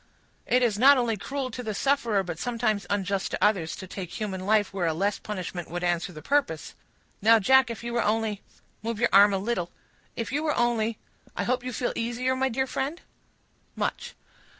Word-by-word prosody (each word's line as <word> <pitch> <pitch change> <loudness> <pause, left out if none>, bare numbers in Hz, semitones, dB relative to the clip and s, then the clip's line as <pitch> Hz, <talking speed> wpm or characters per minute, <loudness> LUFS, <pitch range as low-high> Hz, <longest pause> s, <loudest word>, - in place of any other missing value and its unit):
"It 250 0 +3
is 215 -4 +1
not 275 +3 +7
only 235 -3 +1
cruel 260 +5 -4
to 250 - -5
the 215 -4 -4
sufferer, 235 -6 +1
but 170 -3 -6
sometimes 220 -5 -1
unjust 200 -1 -1
to - - -2
others, 190 -6 +2
to 190 - -8
take 185 -1 -7
human 190 -3 -3
life 210 -2 +2
where 180 -3 0
a 160 - 0
less 200 +4 0
punishment 185 -4 -5
would 175 +2 -4
answer 175 +1 0
the 155 -3 -11
purpose. 275 - 0 0.5
Now, 225 +2 +7
Jack, 260 +4 +5
if 230 0 -6
you 235 0 -4
were 235 - +2
only—move 220 +1 -3
your 240 - +3
arm 200 +1 +8
a 195 - +1
little—if 215 +2 -5
you 290 +3 0
were 305 -1 0
only—I 230 -2 -2
hope 250 0 0
you 255 - -4
feel 245 +1 -2
easier, 240 +3 -1
my 265 0 +1
dear 265 +2 0
friend?" 275 +5 -3 0.8
"Much." - - -3
220 Hz, 190 wpm, -27 LUFS, 195-245 Hz, 0.8 s, arm